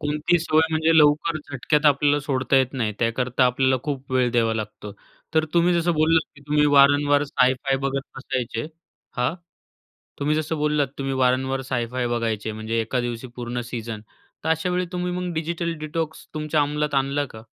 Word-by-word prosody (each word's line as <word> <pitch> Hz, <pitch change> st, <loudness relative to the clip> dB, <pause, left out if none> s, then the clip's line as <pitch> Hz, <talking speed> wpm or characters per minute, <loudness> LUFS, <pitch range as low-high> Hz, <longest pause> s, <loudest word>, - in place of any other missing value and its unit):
कोणती 150 Hz, +4 st, +1 dB
सवय 160 Hz, -1 st, +2 dB
म्हणजे 160 Hz, +1 st, +2 dB
लवकर 155 Hz, +2 st, +4 dB
झटक्यात 150 Hz, +1 st, 0 dB
आपल्याला 145 Hz, 0 st, +4 dB
सोडता 135 Hz, -1 st, 0 dB
येत 130 Hz, 0 st, +2 dB
नाही, 115 Hz, -5 st, -1 dB
त्याकरता 125 Hz, +2 st, +1 dB
आपल्याला 130 Hz, +1 st, +2 dB
खूप 135 Hz, -3 st, -4 dB
वेळ 125 Hz, -2 st, +2 dB
द्यावा 115 Hz, -2 st, +2 dB
लागतो. 105 Hz, -1 st, -6 dB, 0.4 s
तर 160 Hz, 0 st, +4 dB
तुम्ही 175 Hz, +1 st, +4 dB
जसं 170 Hz, 0 st, +2 dB
बोललात, 160 Hz, +1 st, +3 dB
की -, -, -15 dB
तुम्ही 150 Hz, 0 st, +3 dB
वारंवार 145 Hz, 0 st, +5 dB
साय-फाय 130 Hz, 0 st, +1 dB
बघत 135 Hz, 0 st, -2 dB
बसायचे, 125 Hz, -2 st, -3 dB, 0.5 s
हां. 125 Hz, +6 st, 0 dB, 0.8 s
तुम्ही 150 Hz, +2 st, +1 dB
जसं 155 Hz, +1 st, -2 dB
बोललात 150 Hz, -2 st, +1 dB
तुम्ही 135 Hz, 0 st, -2 dB
वारंवार 130 Hz, +1 st, +1 dB
साय-फाय 125 Hz, 0 st, -1 dB
बघायचे, 115 Hz, -2 st, -2 dB
म्हणजे 110 Hz, +1 st, -2 dB
एका 120 Hz, +3 st, -1 dB
दिवशी 120 Hz, +1 st, -4 dB
पूर्ण 120 Hz, 0 st, -4 dB
सीझन. 115 Hz, -2 st, -5 dB, 0.4 s
तर -, -, -1 dB
अशावेळी 180 Hz, +3 st, 0 dB
तुम्ही 180 Hz, 0 st, -2 dB
मग 180 Hz, -1 st, -3 dB
डिजिटल 170 Hz, +1 st, -2 dB
डिटॉक्सची 160 Hz, +1 st, -4 dB
तुमच्या 155 Hz, 0 st, 0 dB
अंमलात 150 Hz, 0 st, -1 dB
आणला 140 Hz, +1 st, +1 dB
का? 110 Hz, 0 st, -11 dB
140 Hz, 165 wpm, -23 LUFS, 125-155 Hz, 0.8 s, वारंवार